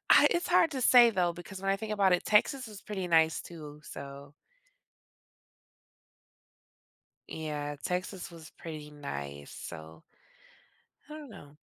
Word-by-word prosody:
I -, -, +8 dB
it's 345 Hz, -, 0 dB
hard 335 Hz, -2 st, +4 dB
to 265 Hz, -, -3 dB
say, 245 Hz, -1 st, +7 dB
though, 180 Hz, -5 st, +1 dB
because 175 Hz, +3 st, -9 dB
when 195 Hz, -, +1 dB
I 195 Hz, -, +2 dB
think 215 Hz, +1 st, -5 dB
about 195 Hz, -3 st, +3 dB
it, 180 Hz, -, +2 dB
Texas 245 Hz, +5 st, +3 dB
was 210 Hz, -3 st, -10 dB
pretty 190 Hz, -4 st, -4 dB
nice 160 Hz, -1 st, +4 dB
too, 150 Hz, -3 st, -10 dB
so 140 Hz, +1 st, -9 dB, 2.9 s
Yeah, 150 Hz, -2 st, -4 dB
Texas 180 Hz, +1 st, -3 dB
was 160 Hz, -2 st, -12 dB
pretty 155 Hz, -2 st, -8 dB
nice, 70 Hz, -, -7 dB
so 80 Hz, -1 st, -9 dB, 1.1 s
I -, -, -8 dB
don't 305 Hz, -3 st, -9 dB
know. 145 Hz, -8 st, -13 dB
170 Hz, 140 wpm, -30 LUFS, 145-210 Hz, 2.9 s, I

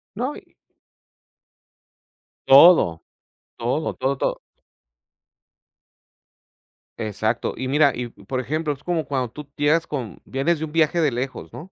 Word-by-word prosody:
No 255 Hz, +7 st, -3 dB
y -, -, -15 dB, 1.9 s
Todo. 135 Hz, -, +7 dB, 0.5 s
Todo, 125 Hz, +7 st, -2 dB
todo, 135 Hz, +2 st, -1 dB
todo. -, -, -1 dB, 2.6 s
Exacto. 110 Hz, +2 st, -2 dB
Y 130 Hz, -, -4 dB
mira, 145 Hz, +1 st, +4 dB
y 125 Hz, 0 st, -4 dB
por 130 Hz, +2 st, -6 dB
ejemplo, 150 Hz, +4 st, -2 dB
es 140 Hz, +1 st, -16 dB
como 170 Hz, -3 st, -1 dB
cuando 130 Hz, -4 st, -2 dB
tú 150 Hz, +2 st, -10 dB
llegas 155 Hz, +3 st, +2 dB
con 125 Hz, -10 st, -6 dB
vienes 145 Hz, +5 st, 0 dB
de 160 Hz, -, -2 dB
un 155 Hz, -, -10 dB
viaje 165 Hz, +1 st, +2 dB
de 150 Hz, -3 st, +2 dB
lejos, 125 Hz, +2 st, -5 dB
¿no? 180 Hz, +5 st, -10 dB
140 Hz, 130 wpm, -22 LUFS, 125-160 Hz, 2.6 s, Todo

